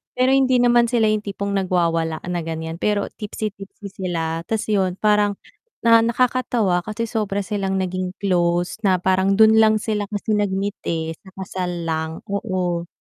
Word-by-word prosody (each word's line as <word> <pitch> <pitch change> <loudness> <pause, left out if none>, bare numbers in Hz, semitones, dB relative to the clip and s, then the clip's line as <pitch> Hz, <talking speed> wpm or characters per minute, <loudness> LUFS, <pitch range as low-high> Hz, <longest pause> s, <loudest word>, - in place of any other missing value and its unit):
pero 255 +1 +3
hindi 260 -2 +4
naman 240 -1 +4
sila 225 -3 +3
yung 215 -1 0
tipong 200 0 -3
nagwawala 165 -4 0
na 175 -1 -1
ganyan 160 +1 -5
pero 205 -1 +1
tipsy-tipsy 205 -1 -6
sila, 165 -3 -3
tas 220 -1 -1
yun 190 -3 +1
parang 210 -1 +3 0.5
na 230 0 +7
nakakatawa 235 -6 +1
kasi 215 +3 -4
sobra 210 -3 -2
silang 195 -1 -1
naging 185 0 -2
close, 175 -1 0
na 190 -2 +4
parang 190 +1 +2
dun 220 0 +7
lang 220 0 +5
sila 210 -1 -2
kasi 215 +1 -2
nag-meet 200 0 -1
eh, 160 -1 -2
sa 190 - -16
kasal 185 -1 -3
lang, 160 0 -2 0.2
oo. 180 -5 -2
195 Hz, 155 wpm, -21 LUFS, 180-215 Hz, 0.5 s, na